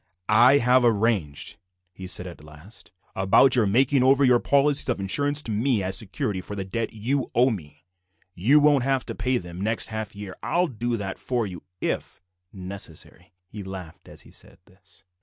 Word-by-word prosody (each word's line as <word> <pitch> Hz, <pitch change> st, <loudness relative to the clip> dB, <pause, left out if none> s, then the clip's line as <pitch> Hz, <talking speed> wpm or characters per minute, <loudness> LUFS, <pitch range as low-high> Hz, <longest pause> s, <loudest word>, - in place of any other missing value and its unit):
"I 130 Hz, +4 st, +7 dB
have 125 Hz, -1 st, +3 dB
arranged," 105 Hz, -13 st, 0 dB, 0.3 s
he 95 Hz, +1 st, -10 dB
said 90 Hz, 0 st, -1 dB
at 85 Hz, -4 st, -10 dB
last, 80 Hz, +5 st, -12 dB, 0.2 s
"about 95 Hz, +7 st, +4 dB
your 115 Hz, -4 st, +2 dB
making 130 Hz, +6 st, +2 dB
over 135 Hz, +2 st, +4 dB
your 125 Hz, -1 st, +4 dB
policies 140 Hz, +1 st, +2 dB
of 120 Hz, -, -1 dB
insurance 145 Hz, +9 st, +1 dB
to 115 Hz, -, -5 dB
me 110 Hz, 0 st, 0 dB
as 95 Hz, +1 st, +1 dB
security 100 Hz, -2 st, -1 dB
for 105 Hz, -, -8 dB
the 95 Hz, -1 st, -4 dB
debt 115 Hz, +4 st, -3 dB
you 125 Hz, +5 st, -2 dB
owe 125 Hz, +2 st, +4 dB
me. 75 Hz, -6 st, -9 dB, 0.5 s
You 125 Hz, +13 st, +4 dB
won't 145 Hz, -3 st, +4 dB
have 135 Hz, -1 st, 0 dB
to -, -, -5 dB
pay 130 Hz, 0 st, -1 dB
them 90 Hz, -2 st, -8 dB
next 110 Hz, +3 st, -1 dB
half 110 Hz, -1 st, -5 dB
year, 100 Hz, -2 st, -8 dB
I'll 175 Hz, +1 st, +1 dB
do 120 Hz, -5 st, -3 dB
that 95 Hz, -2 st, -5 dB
for 120 Hz, -3 st, -2 dB
you 90 Hz, -3 st, -8 dB, 0.2 s
if -, -, -3 dB, 0.3 s
necessary." 90 Hz, -2 st, -8 dB
He 105 Hz, +3 st, -9 dB
laughed 95 Hz, -4 st, -9 dB
as -, -, -11 dB
he -, -, -17 dB
said -, -, -12 dB
this. 95 Hz, 0 st, -21 dB
110 Hz, 185 wpm, -24 LUFS, 95-130 Hz, 0.5 s, I